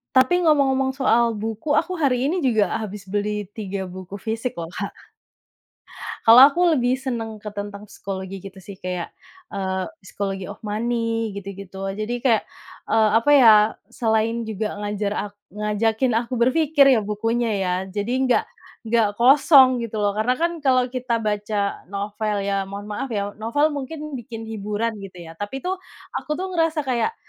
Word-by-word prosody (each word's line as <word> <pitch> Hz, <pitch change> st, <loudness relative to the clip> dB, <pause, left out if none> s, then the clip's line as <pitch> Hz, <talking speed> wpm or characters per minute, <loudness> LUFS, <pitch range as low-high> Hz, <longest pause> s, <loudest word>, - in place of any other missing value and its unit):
Tapi 335 Hz, +7 st, +4 dB
ngomong-ngomong 265 Hz, -3 st, +3 dB
soal 235 Hz, -4 st, +2 dB
buku, 225 Hz, +7 st, -2 dB
aku 365 Hz, +2 st, 0 dB
hari 255 Hz, -5 st, +2 dB
ini 365 Hz, -, 0 dB
juga 220 Hz, -, +2 dB
habis 210 Hz, -2 st, -6 dB
beli 205 Hz, +1 st, -3 dB
3 200 Hz, -3 st, -4 dB
buku 185 Hz, +1 st, -8 dB
fisik 225 Hz, +4 st, -3 dB
loh, 165 Hz, -1 st, -6 dB
Kak. -, -, -5 dB, 1.3 s
Kalau 230 Hz, +2 st, +9 dB
aku 345 Hz, +5 st, +1 dB
lebih 250 Hz, -2 st, +2 dB
senang 235 Hz, -4 st, -4 dB
ke 210 Hz, 0 st, -8 dB
tentang 205 Hz, 0 st, -6 dB
psikologi 190 Hz, -1 st, -7 dB
gitu 195 Hz, +1 st, -11 dB
sih 200 Hz, -2 st, -11 dB
kayak, 180 Hz, -2 st, -4 dB, 0.4 s
eee, 190 Hz, -2 st, -2 dB, 0.2 s
Psychology 195 Hz, -1 st, -5 dB
of 205 Hz, -, -7 dB
Money, 225 Hz, 0 st, -1 dB
gitu 200 Hz, 0 st, -6 dB
gitu. 195 Hz, 0 st, -8 dB
Jadi 215 Hz, +4 st, -3 dB
kayak, 235 Hz, -4 st, +2 dB, 0.4 s
eee, 220 Hz, -1 st, +4 dB
apa 230 Hz, -, -4 dB
ya, 240 Hz, -5 st, +8 dB, 0.4 s
selain 225 Hz, 0 st, 0 dB
juga 215 Hz, 0 st, -3 dB
ngajar 205 Hz, 0 st, -2 dB, 0.2 s
ak -, -, -22 dB, 0.2 s
ngajakin 220 Hz, +3 st, 0 dB
aku 235 Hz, +2 st, -2 dB
berpikir 280 Hz, +2 st, +4 dB
ya 215 Hz, -, -1 dB
bukunya 225 Hz, +3 st, -1 dB
ya, 180 Hz, -1 st, 0 dB, 0.2 s
jadi 205 Hz, +2 st, -3 dB
enggak 260 Hz, -2 st, +2 dB, 0.4 s
enggak 225 Hz, -2 st, +2 dB
kosong 260 Hz, -1 st, +6 dB
gitu 220 Hz, -2 st, -4 dB
loh, 205 Hz, -1 st, +2 dB
karena 225 Hz, +4 st, +2 dB
kan 340 Hz, +4 st, -1 dB
kalau 255 Hz, -2 st, +3 dB
kita 245 Hz, -2 st, -1 dB
baca 210 Hz, -2 st, -2 dB
novel 205 Hz, +1 st, -2 dB
ya, 195 Hz, 0 st, -1 dB
mohon 200 Hz, +2 st, -7 dB
maaf 210 Hz, +6 st, -3 dB
ya, 200 Hz, -1 st, -1 dB
novel 260 Hz, +8 st, +1 dB
mungkin 295 Hz, +1 st, -5 dB
bikin 225 Hz, -1 st, -8 dB
hiburan 215 Hz, +1 st, -2 dB
gitu 185 Hz, -3 st, -10 dB
ya, 165 Hz, 0 st, -12 dB
tapi 205 Hz, +7 st, -5 dB
tuh 370 Hz, +1 st, -2 dB, 0.4 s
aku 300 Hz, -, -3 dB
tuh 375 Hz, +4 st, -4 dB
ngerasa 325 Hz, -3 st, +1 dB
kayak, 260 Hz, -, 0 dB
220 Hz, 165 wpm, -22 LUFS, 205-255 Hz, 1.3 s, Kalau